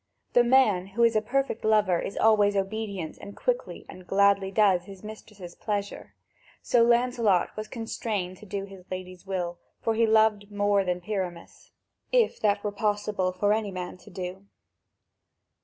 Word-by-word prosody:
The 245 Hz, -, +6 dB
man 235 Hz, -7 st, +4 dB
who 215 Hz, +5 st, 0 dB
is 230 Hz, -1 st, +4 dB
a 215 Hz, -, +3 dB
perfect 270 Hz, +1 st, -1 dB
lover 210 Hz, -5 st, +3 dB
is -, -, -5 dB
always 210 Hz, -2 st, +4 dB
obedient 195 Hz, -3 st, -3 dB
and 200 Hz, -, -10 dB
quickly -, -, -2 dB
and 185 Hz, -1 st, -12 dB
gladly 200 Hz, 0 st, +3 dB
does 195 Hz, -3 st, +3 dB
his 195 Hz, 0 st, -12 dB
mistress' 210 Hz, -4 st, -10 dB
pleasure. 205 Hz, -2 st, -4 dB, 0.5 s
So 240 Hz, -, +3 dB
Lancelot 235 Hz, -5 st, +2 dB
was 215 Hz, 0 st, -5 dB
constrained 215 Hz, -5 st, -4 dB
to 215 Hz, -, -14 dB
do 195 Hz, +1 st, -3 dB
his 195 Hz, -2 st, -13 dB
Lady's 185 Hz, 0 st, -7 dB
will, 175 Hz, -2 st, -3 dB, 0.2 s
for 225 Hz, -, 0 dB
he 225 Hz, +1 st, +2 dB
loved 220 Hz, -2 st, +3 dB
more 205 Hz, -1 st, +2 dB
than 180 Hz, -1 st, -2 dB
Pyramus, 180 Hz, -3 st, -5 dB, 0.4 s
if -, -, +2 dB
that 205 Hz, -1 st, +1 dB
were 210 Hz, -, -1 dB
possible 205 Hz, -2 st, -1 dB
for 205 Hz, +3 st, +1 dB
any 215 Hz, -1 st, -1 dB
man 180 Hz, -1 st, -6 dB
to 180 Hz, -, -16 dB
do. 185 Hz, +2 st, -7 dB
205 Hz, 160 wpm, -27 LUFS, 185-220 Hz, 0.5 s, The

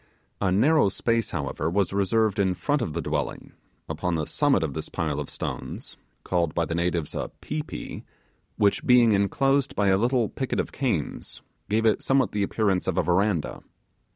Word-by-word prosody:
A 95 Hz, -2 st, +2 dB
narrow 135 Hz, -, +4 dB
space, 115 Hz, +2 st, 0 dB
however, 75 Hz, 0 st, -2 dB
was 95 Hz, +2 st, 0 dB
reserved 105 Hz, +1 st, +1 dB
in 95 Hz, -2 st, +2 dB
front 145 Hz, -, 0 dB
of 85 Hz, -10 st, -2 dB
the 85 Hz, -, -3 dB
dwelling, -, -, -3 dB, 0.4 s
upon 90 Hz, -1 st, -2 dB
the 80 Hz, -2 st, -1 dB
summit 140 Hz, -, +2 dB
of 75 Hz, -4 st, -2 dB
this -, -, -5 dB
pile 75 Hz, -3 st, -2 dB
of 75 Hz, -, -5 dB
stones -, -, -5 dB, 0.3 s
(called 85 Hz, -3 st, 0 dB
by 85 Hz, -, +1 dB
the 85 Hz, -, -4 dB
natives 85 Hz, -2 st, -1 dB
a -, -, -3 dB
'pi 155 Hz, -, -3 dB
pi'), 155 Hz, -, -7 dB, 0.5 s
which 100 Hz, -1 st, +2 dB
being 120 Hz, -2 st, +6 dB
enclosed 135 Hz, +7 st, +2 dB
by 100 Hz, -1 st, +2 dB
a 95 Hz, 0 st, +4 dB
little 120 Hz, 0 st, +2 dB
picket 130 Hz, +4 st, -3 dB
of -, -, -2 dB
canes, 120 Hz, -, -3 dB, 0.3 s
gave 110 Hz, +2 st, +1 dB
it 110 Hz, -, +3 dB
somewhat 135 Hz, -6 st, +2 dB
the 105 Hz, -, -1 dB
appearance 100 Hz, -2 st, 0 dB
of 95 Hz, -, -1 dB
a -, -, +3 dB
verandah. 90 Hz, -2 st, 0 dB
100 Hz, 180 wpm, -26 LUFS, 85-120 Hz, 0.5 s, being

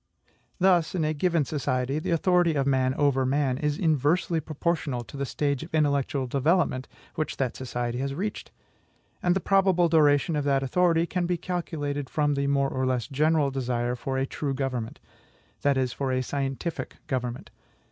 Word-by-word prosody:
Thus, 180 Hz, -3 st, +3 dB
in 165 Hz, -4 st, +1 dB
a 155 Hz, -, 0 dB
given 165 Hz, -1 st, +1 dB
society, 135 Hz, -1 st, -1 dB
the 160 Hz, -, -4 dB
authority 175 Hz, -1 st, +3 dB
of 140 Hz, -2 st, +1 dB
man 130 Hz, -1 st, +2 dB
over 140 Hz, -2 st, +2 dB
man 135 Hz, 0 st, +1 dB
is 150 Hz, -1 st, 0 dB
inversely 160 Hz, +2 st, +1 dB
proportional 155 Hz, -4 st, -2 dB
to 120 Hz, -, -12 dB
the 140 Hz, 0 st, -3 dB
stage 140 Hz, -1 st, -1 dB
of 160 Hz, -, -9 dB
intellectual 140 Hz, -3 st, +1 dB
development 140 Hz, 0 st, +1 dB, 0.3 s
which 155 Hz, -, -3 dB
that 130 Hz, -3 st, -1 dB
society 120 Hz, -1 st, -3 dB
has 135 Hz, +1 st, -2 dB
reached; 205 Hz, +6 st, -4 dB, 0.7 s
and 180 Hz, 0 st, +2 dB
the -, -, +2 dB
probable 190 Hz, -3 st, +3 dB
duration 150 Hz, 0 st, +4 dB
of 145 Hz, -, 0 dB
that 135 Hz, -1 st, +2 dB
authority 170 Hz, +3 st, +2 dB
can 175 Hz, 0 st, -1 dB
be 175 Hz, 0 st, 0 dB
calculated 145 Hz, -6 st, -3 dB
from 145 Hz, -1 st, +1 dB
the 140 Hz, 0 st, 0 dB
more 140 Hz, -1 st, +2 dB
or 130 Hz, 0 st, -1 dB
less 125 Hz, -3 st, 0 dB
general 150 Hz, 0 st, +2 dB
desire 125 Hz, -2 st, -1 dB
for 130 Hz, +2 st, -3 dB
a 135 Hz, -, +1 dB
true 140 Hz, 0 st, -3 dB
government, 130 Hz, -4 st, -3 dB, 0.6 s
that 140 Hz, -1 st, +2 dB
is, 130 Hz, -2 st, 0 dB
for 135 Hz, -2 st, -2 dB
a 130 Hz, 0 st, 0 dB
scientific 140 Hz, +5 st, -3 dB
government. 125 Hz, -2 st, -4 dB
145 Hz, 175 wpm, -26 LUFS, 130-165 Hz, 0.7 s, duration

